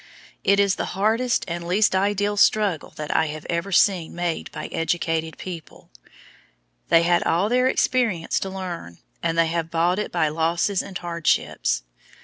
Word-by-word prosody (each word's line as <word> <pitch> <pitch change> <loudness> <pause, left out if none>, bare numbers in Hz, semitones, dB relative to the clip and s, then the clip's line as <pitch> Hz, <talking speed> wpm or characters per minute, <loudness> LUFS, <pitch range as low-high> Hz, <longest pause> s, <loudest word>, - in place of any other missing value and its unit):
It 200 +1 +4
is 200 -2 +3
the - - -4
hardest 225 +4 +1
and 170 -1 -4
least 195 +2 +3
ideal 205 +1 +1
struggle 205 -5 +2
that 150 -1 -4
I 160 - +3
have 155 0 -7
ever 170 +4 -2
seen 180 -3 +2
made 175 -1 -3
by - - -6
educated 165 -1 -1
people. 170 - -9 1.0
They 165 - +5
had 175 0 +3
all 180 +6 +1
their 250 +2 +3
experience 235 -10 +1
to 195 - -4
learn, 180 - -6 0.2
and 165 0 -1
they 165 - +5
have 165 0 -2
bought 170 +3 +1
it 210 - -3
by 170 -3 +1
losses 170 +5 0
and 195 -2 -6
hardships. 170 - 0
175 Hz, 160 wpm, -23 LUFS, 165-200 Hz, 1.0 s, They